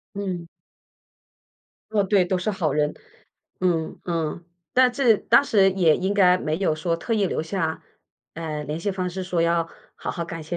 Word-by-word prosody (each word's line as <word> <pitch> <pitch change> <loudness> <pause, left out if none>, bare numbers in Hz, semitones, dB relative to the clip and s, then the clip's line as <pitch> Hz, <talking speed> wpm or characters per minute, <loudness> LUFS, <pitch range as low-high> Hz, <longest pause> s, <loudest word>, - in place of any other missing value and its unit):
嗯。 185 -4 -4 1.5
嗯， 200 -2 +2
对， 195 -2 +4
都 185 +1 0
是 180 +4 -2
好 165 -7 -1
人。 150 0 +1 0.7
嗯 170 -3 0
嗯。 170 -1 -3 0.3
但 255 -1 +4
这 245 -4 +4
当 275 - +4
时 195 -7 +4
也 175 -5 +4
应 190 +2 -1
该 185 -2 +5
没 155 -2 -2
有 185 -5 +1
说 165 +1 -1
特 230 +7 -4
意 205 -3 +2
留 160 - -2
下， 160 -2 -2 0.5
呃， 155 -2 -4
联 150 +2 -4
系 200 +4 -2
方 185 -1 -2
式 190 +2 -5
说 175 -2 0
要 170 0 +1 0.3
好 - - -4
好 170 -1 -4
感 165 -1 -7
谢 175 +3 -4
175 Hz, 195 characters per minute, -24 LUFS, 165-195 Hz, 1.5 s, 该